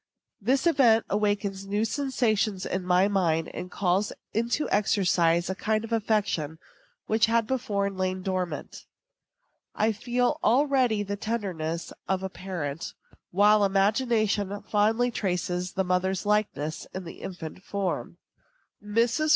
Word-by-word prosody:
This 260 - +1
event 250 -9 +4
awakens 200 -1 0
new 205 +2 0
sensations 220 -8 0
in 185 0 -2
my 180 +2 +3
mind, 170 -5 +1
and 180 - -6
calls 190 +2 0 0.2
into 235 +7 0
exercise 175 -4 +2
a 190 - -1
kind 215 +3 -1
of 225 0 -5
affection 200 -8 0 0.5
which 220 0 +3
had 230 0 +2
before 215 -5 -1
lain 185 -1 -2
dormant. 185 -2 -4 0.9
I 220 +1 +2
feel 245 +6 0
already 250 -3 +3
the 205 0 -4
tenderness 180 -7 -3
of 190 0 0
a 190 - -2
parent, 170 -6 -5 0.3
while 205 +3 +5
imagination 205 0 +1
fondly 225 +4 +2
traces 180 -3 -2
the 190 - +1
mother's 185 +1 0
likeness 205 -8 -1
in 185 - -4
the 165 - -10
infant 175 -1 -7
form. 200 -3 -3 0.7
Mrs. 235 +8 +1
205 Hz, 125 wpm, -27 LUFS, 185-225 Hz, 0.9 s, while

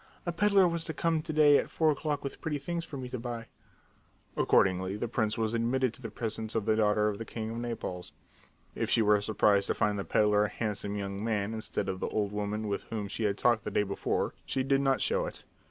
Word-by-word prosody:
"A 175 - 0
peddler 195 +1 +4
was 170 -1 -1
to 160 - -4
come 165 -1 +1
to 155 - -4
day 150 -2 +6
at - - -3
four 160 -1 +2
o'clock 150 0 -2
with 140 - -6
pretty 155 -3 -1
things 170 +4 -3
for 150 -3 -7
me 130 -1 -5
to 125 -1 -4
buy." 120 -1 -5 0.9
Accordingly, 95 +1 +2
the 120 - -2
prince 110 -2 0
was 110 0 0
admitted 120 +1 +1
to - - -12
the 115 - -5
presence 110 0 -4
of 110 -3 0
the 110 -1 +3
daughter 105 -1 +3
of 105 -1 -2
the - - -3
king 110 0 -5
of 115 - -5
Naples. 115 -7 -5 0.6
If - - -2
she 115 - +4
were 105 -1 +4
surprised 100 -1 +3
to - - 0
find 105 -1 +1
the - - -2
peddler 105 +3 +3
a - - -2
handsome 105 -2 -3
young 100 0 -4
man 110 -2 -1
instead 110 -2 -3
of 95 -1 -3
the - - -2
old 105 -2 -1
woman 105 +1 -2
with 100 -1 -1
whom 105 -3 -4
she 110 +2 -2
had 100 -1 0
talked 120 -2 +2
the - - -3
day - - +1
before 100 -1 -1
she 130 - -1
did 135 +1 +2
not 135 -1 +2
show - - +1
it. - - -9
110 Hz, 240 wpm, -30 LUFS, 105-135 Hz, 0.9 s, day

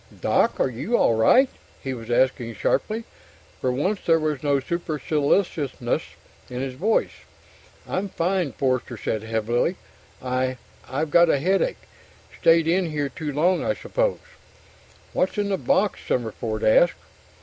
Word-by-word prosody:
"Doc! - - +2
Are - - +3
you 130 - -1
all - - +3
right?" 180 - +5 0.4
he 135 - -3
was 115 -2 -8
asking 120 -1 +1
sharply. 220 - 0 0.6
For 130 - 0
once, 185 +11 0
there 165 -1 +4
was 155 -3 -1
no 145 -2 +2
superciliousness 150 -3 -1 0.5
in 125 - -5
his 130 0 -3
voice. 200 - +1 0.8
"I'm 195 +2 -2
fine," 180 -3 0
Forster 130 -3 -1
said 110 +1 -2
heavily. 115 - 0 0.4
"I 130 0 -1 0.3
I've 150 +3 -2
got 170 +1 +6
a - - +4
headache. 195 - 0 0.6
Stayed 165 -1 +5
in 175 +1 +2
here 145 -2 -2
too 150 0 -5
long, 170 +6 +2
I - - 0
suppose." - - -1 1.0
"What's 185 - 0
in 205 -1 0
the 195 - +1
box?" 275 -7 +1
Summerford 110 -2 -2
asked. 170 +10 +5
150 Hz, 140 wpm, -24 LUFS, 125-185 Hz, 1.0 s, got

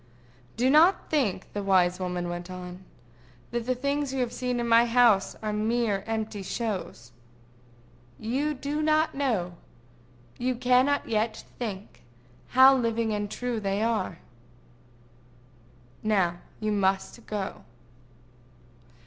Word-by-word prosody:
"Do 245 +2 +2
not 330 +6 +4
think," 230 -12 0
the 205 - -2
wise 185 -2 +3
woman 180 -1 -3
went 175 +1 -5
on, 180 0 -8 0.7
"that 240 0 -3
the 255 - +1
things 280 +2 -1
you 265 - -3
have 240 -1 -2
seen 250 -1 -2
in 235 - -1
my 230 +1 +5
house 230 -5 +4
are 215 -1 -1
mere 215 -1 0
empty 220 -2 -3
shows. 190 - -4 1.1
You 275 +7 -1
do 290 +3 -3
not 310 +1 +2
know, 210 -11 -1 0.8
you 255 +1 0
cannot 255 +4 +2
yet 220 0 -1 0.2
think, 210 -4 -6 0.6
how 265 +1 +9
living 230 -3 0
and 205 0 -2
true 245 +1 -3
they 200 +1 -1
are.—Now 120 - -5 0.2
you 215 0 -1
must 195 +3 0
go." 205 -3 -4
215 Hz, 120 wpm, -27 LUFS, 180-245 Hz, 1.1 s, how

